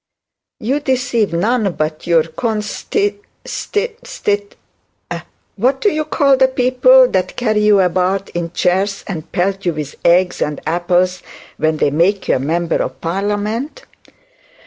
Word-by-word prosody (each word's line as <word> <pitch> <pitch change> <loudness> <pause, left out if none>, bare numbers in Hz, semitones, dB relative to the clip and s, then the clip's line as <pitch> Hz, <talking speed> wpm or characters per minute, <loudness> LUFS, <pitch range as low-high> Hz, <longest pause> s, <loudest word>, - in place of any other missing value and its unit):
'You 265 +7 0
deceive 250 -6 0
none 205 +3 +1
but 155 0 -3
your 165 -2 +4
consti 220 - -2 0.3
stit 460 +3 -3
stit; 205 - -2 1.0
what 260 +6 +1
do 415 - +2
you 310 -2 -1
call 280 -2 +3
the 260 0 +5
people 255 0 +5
that 185 -1 -1
carry 215 -3 +1
you 210 -1 +5
about 185 +2 0
in 170 -1 -4
chairs 190 +3 0
and 165 -4 -6
pelt 195 +2 -1
you 175 - 0
with 150 -2 -5
eggs 180 +1 +3
and 150 -1 -1
apples 175 +2 +1 0.4
when 155 0 +1
they 145 - +1
make 180 +6 +1
you - - +3
a - - -4
member 165 +5 0
of - - -4
parliament?' 210 - -2
195 Hz, 145 wpm, -17 LUFS, 175-250 Hz, 1.0 s, the